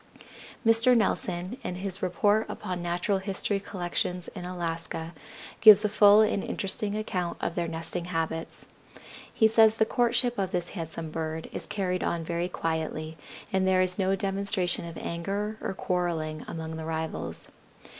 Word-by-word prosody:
Mr. 230 +2 +6
Nelson, 190 +1 -1
in 180 - -3
his 190 +1 -3
"Report 205 +4 +2
Upon 180 -1 -4
Natural 175 +3 0
History 195 +1 -1
Collections 180 -2 -3
in 175 - -8
Alaska," 165 -2 -4 0.5
gives 215 -1 +9
a - - +2
full 210 0 +7
and 210 -2 +2
interesting 200 +1 -2
account 180 -5 -2
of - - -2
their 170 0 -1
nesting 165 +1 -3
habits. 165 -1 -3 0.7
He 220 - +4
says 220 0 +5
the 220 - +4
courtship 240 0 +1
of 190 -2 0
this 175 -2 -2
handsome 165 -3 -5
bird 160 0 -4
is - - -5
carried 185 -2 -1
on 170 -1 -1
very 170 +2 -2
quietly, 160 -2 -3 0.4
and 190 0 +2
there 185 0 +4
is 180 +1 0
no 190 0 +2
demonstration 195 -2 0
of 165 - -8
anger 200 +6 -3
or 190 - -3
quarreling 165 -5 -2
among 160 -1 -5
the 160 - -5
rivals. 160 0 -4
180 Hz, 155 wpm, -28 LUFS, 165-205 Hz, 0.7 s, gives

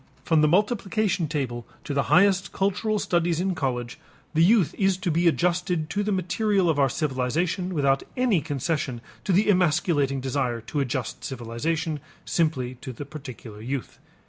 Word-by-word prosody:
From 160 -2 +3
the 155 - +5
multiplication 200 -1 +1
table 130 -6 -3 0.2
to 145 - -4
the 140 - +2
highest 195 +1 +4
cultural 200 +3 0
studies 170 -4 +1
in 190 +1 0
college, 125 -6 -3 0.3
the 160 +1 +4
youth 185 - +4
is 195 -2 +3
to 185 -2 -1
be 170 +2 +2
adjusted 175 -1 +1
to 205 - 0
the 205 +1 -1
material 190 0 +1
of 145 - -1
our 135 -1 +4
civilization 155 +7 -1
without 140 -5 +2 0.2
any 240 -9 +3
concession 145 -3 -2 0.2
to 200 - +1
the 195 +4 +3
emasculating 160 -7 +2
desire 130 -2 -1
to 125 +6 -4
adjust 130 -2 -3
civilization 145 +6 -2 0.3
simply 135 -7 0
to 130 - -6
the 125 +4 -7
particular 130 -7 -9
youth. 130 +2 -5
160 Hz, 160 wpm, -25 LUFS, 135-185 Hz, 0.3 s, the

